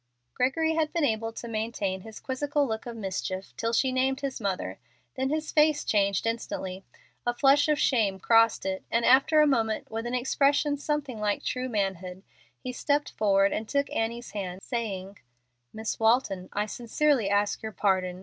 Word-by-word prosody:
Gregory 320 +6 +1
had 320 -1 0
been 335 - 0
able 225 -2 -1
to 235 - -8
maintain 215 -4 -2
his 220 +2 -10
quizzical 285 +2 -1
look 220 -1 -4
of 235 - -6
mischief 190 -2 -4
till 230 0 -1
she 255 +3 +2
named 265 +2 0
his 270 -3 -4
mother; 180 - -3 0.3
then 265 0 -1
his 310 +1 -2
face 305 -1 +3
changed 200 -2 +1
instantly. 195 -5 -3 0.4
A 240 0 -1
flush 280 +3 +4
of 300 -1 +2
shame 215 -9 +2
crossed 225 +2 +4
it, 190 0 -2
and 230 0 +1
after 275 +5 +5
a - - +6
moment, 225 -8 0
with 225 +1 -3
an 245 - -2
expression 285 +3 +2
something 290 -5 -3
like 210 -1 -1
true 255 0 -2
manhood, 190 -3 -3 0.3
he 255 - -6
stepped 290 +3 0
forward 195 -2 +2
and 215 0 -4
took 280 0 0
Annie's 235 +2 -2
hand, 190 -2 -5
saying, 200 -5 -4 0.5
"Miss 220 0 -4
Walton, 220 -5 +2
I 205 +1 -1
sincerely 240 +1 +1
ask 205 0 +1
your 220 - -5
pardon. 185 -2 0
230 Hz, 175 wpm, -27 LUFS, 200-270 Hz, 0.5 s, a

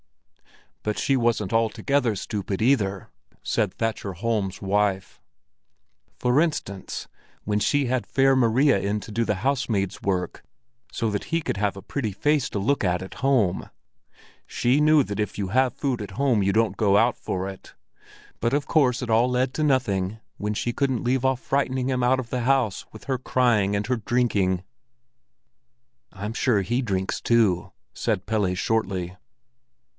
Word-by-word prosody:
"But 105 0 -2
she 135 - +1
wasn't 115 -5 0
altogether 115 +2 +1
stupid 100 0 -4
either," 105 -6 +1 0.3
said 105 -5 0
Thatcher 110 -3 -2
Holm's 100 -1 -2
wife. 100 -1 -1 1.0
"For 125 +4 +3
instance 125 - -3 0.4
when 105 0 0
she 145 +6 +2
had 125 0 -1
Fair 135 0 +3
Maria 130 0 +3
in 100 +2 -1
to 110 - -10
do 115 0 0
housemaid's 105 -3 -1
work, 90 -3 -2 0.5
so 115 -2 -1
that 100 - -3
he 165 - 0
could 150 - -3
have 100 -2 -1
a 100 - -9
pretty 120 -7 -3
face 145 +6 +1
to - - -4
look 115 +8 +1
at 90 -1 0
at 95 - -9
home. 125 -10 +1 0.8
She 130 +5 +1
knew 155 -1 +5
that 105 -3 -5
if 105 -1 -2
you 100 -2 -2
have 130 +3 +2
food 130 -5 -2
at 105 - -6
home 130 -6 +2
you 100 0 +2
don't 110 -2 +1
go 100 -2 +3
out 120 +3 +3
for 95 +1 -3
it. 95 -1 -10 0.6
But 115 +2 0
of 145 - 0
course 130 -5 +2
it 120 - -5
all 115 +3 +4
led 125 +1 0
to 155 - -1
nothing 110 -8 +1 0.2
when 105 +1 -2
she 120 +3 -1
couldn't 130 -3 0
leave 125 +1 +1
off 130 -1 +2
frightening 130 -2 0
him 130 -1 0
out 130 +2 +3
of 115 -3 -6
the 125 - -1
house 125 -5 +1
with 110 - -12
her 130 -2 -2
crying 115 -6 +2
and 100 0 -1
her 125 0 0
drinking." 105 -6 +1 1.5
"I'm 105 +3 -5
sure 115 -4 +2
he 120 +6 0
drinks 95 -5 -2
too!" 105 -7 +2 0.2
said 90 - -1
Pelle 105 -4 0
shortly. 95 -3 -1
115 Hz, 165 wpm, -24 LUFS, 100-130 Hz, 1.5 s, knew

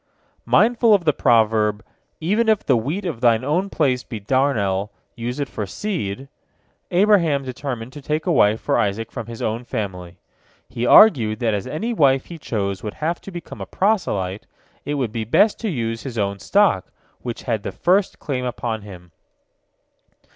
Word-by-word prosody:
Mindful 230 -1 +4
of 185 -4 -2
the 150 - +4
proverb, 110 -4 +2 0.3
"Even 210 +8 +1
if 215 -2 +2
the 130 - +4
wheat 150 - -2
of 150 -10 -4
thine 115 -2 +3
own 175 +8 0
place 130 -8 0
be 110 - -7
darnel, 105 -5 0 0.3
use 120 +4 -4
it 140 - -1
for 105 -5 -5
seed," 135 - -4 0.6
Abraham 175 -7 +3
determined 130 -2 -5
to 145 - -9
take 150 +3 -2
a 180 - +1
wife 110 -7 +4
for - - 0
Isaac 105 +2 -1
from 115 - -6
his 115 -1 -7
own 115 +3 -2
family. 95 -7 -5 0.5
He 120 +1 -3
argued 120 - +6
that 115 -2 +1
as 100 +2 -3
any 205 - -3
wife 135 - +3
he 170 -2 -10
chose 100 -8 -3
would 105 - -6
have 165 +3 -2
to - - -9
become 175 -2 -9
a - - -6
proselyte, 105 - -1 0.4
it 145 - -2
would 130 -6 -1
be 115 0 -3
best 205 - +3
to 225 - -2
use 115 -7 -3
his 125 -4 -7
own 100 -1 -1
stock, 195 - +2 0.3
which 120 -2 -6
had 115 -4 -1
the - - -5
first 185 +2 +1
claim 130 -3 -3
upon 120 -2 -3
him. 90 -4 -12
125 Hz, 175 wpm, -21 LUFS, 110-165 Hz, 0.6 s, argued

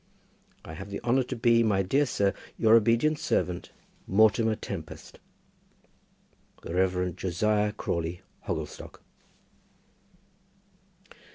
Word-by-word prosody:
I 80 - -8
have 95 +4 -8
the 100 - -5
honour 125 +2 +2
to 130 +1 -4
be, 115 0 +3
My 100 -4 +2
dear 140 +10 +1
sir, 100 -4 +1 0.2
Your 110 -2 +3
very 115 - +9
obedient 115 +7 +2
servant, 90 -1 -1 0.4
MORTIMER 110 +2 +3
TEMPEST. 90 -7 -8 1.4
The - - -6
Rev. 90 -1 0
Josiah 105 +4 0
Crawley, 85 -4 -3 0.3
Hogglestock. - - -6
105 Hz, 105 wpm, -27 LUFS, 90-115 Hz, 1.4 s, very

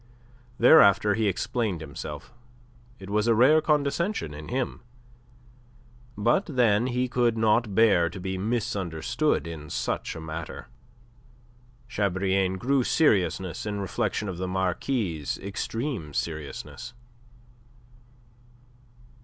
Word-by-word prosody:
Thereafter 105 -6 +6
he 110 0 +1
explained 100 -1 -1
himself. 75 +9 -8 0.6
It 100 -2 -10
was 105 +2 +1
a 115 - +4
rare 140 +7 +5
condescension 150 - 0
in 75 +1 -9
him. 130 0 -3 1.4
But, 120 - +2
then, 120 - +2
he 125 0 0
could 120 -2 +1
not 110 -1 +2
bear 100 -7 +4
to 90 - -9
be 95 +1 -3
misunderstood 110 - -1
in 80 -2 -8
such - - -3
a - - -6
matter. 80 0 -7 1.2
Chabrillane 95 -3 0
grew 130 +5 +1
serious 110 - +2 0.2
in 105 -1 -3
reflection 105 +2 -2
of 90 -2 -5
the 95 - -2
Marquis' 95 - -1
extreme 100 - -4
seriousness. 80 - -5
105 Hz, 105 wpm, -26 LUFS, 90-120 Hz, 1.4 s, Thereafter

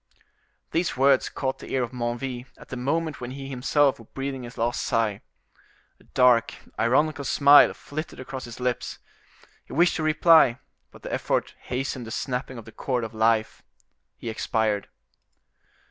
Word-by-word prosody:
These 170 -3 0
words 135 0 +4
caught 130 -1 -3
the - - -10
ear 130 - +2
of 120 - -4
Menneville 125 +1 -4
at - - -15
the - - -5
moment 145 +4 -2
when 120 - -5
he 135 +1 -7
himself 135 +1 +2
was 115 - -14
breathing 135 -1 -3
his 120 0 -10
last 120 +1 0
sigh. 110 -3 0 0.8
A - - -23
dark, 125 -3 +4 0.2
ironical 145 +5 +2
smile 140 +2 +6
flitted 155 +2 -7
across 130 0 -6
his 120 0 -10
lips; 125 -1 -2 0.7
he - - -12
wished 175 +4 +3
to - - -2
reply, 155 -4 +5 0.3
but - - -17
the - - -5
effort - - -1
hastened 125 -1 -4
the - - -6
snapping 125 +2 -3
of 115 - -9
the 115 - -11
chord 125 +1 -2
of 115 - -6
life—he 110 +1 -3
expired. 110 -2 -1
130 Hz, 160 wpm, -25 LUFS, 120-140 Hz, 0.8 s, smile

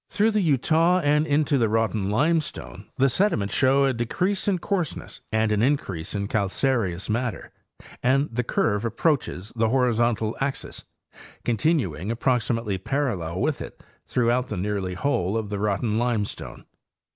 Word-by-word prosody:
Through 215 +2 +2
the 210 -1 +1
Eutaw 165 +3 +3
and 150 +2 +3
into 145 -1 +2
the 115 -2 +2
Rotten 110 -2 0
limestone 145 - -1
the 135 - +4
sediments 120 - +1
show 135 +1 +4
a 135 - +2
decrease 180 - -1
in 195 -2 +2
coarseness 175 -3 -3
and 110 0 +1
an 105 -1 +2
increase 105 - -1
in 100 0 -2
cal 100 -2 0
careous 100 -7 0
matter, 120 +2 -2 0.5
and 135 +3 +2
the 125 +2 0
curve 105 -2 0
approaches 115 - -1
the 115 -1 +2
horizontal 120 -3 +1
axis, 135 0 -4 0.6
continuing 110 - 0
approximately 115 -4 0
parallel 95 - -2
with - - 0
it - - -8 0.3
throughout 125 +1 +1
nearly 100 -2 -2
the - - -10
whole 110 -8 +1
of 105 -2 -4
the 100 - -2
Rotten 105 +2 0
limestone. 115 -4 -3
120 Hz, 145 wpm, -25 LUFS, 105-140 Hz, 0.6 s, the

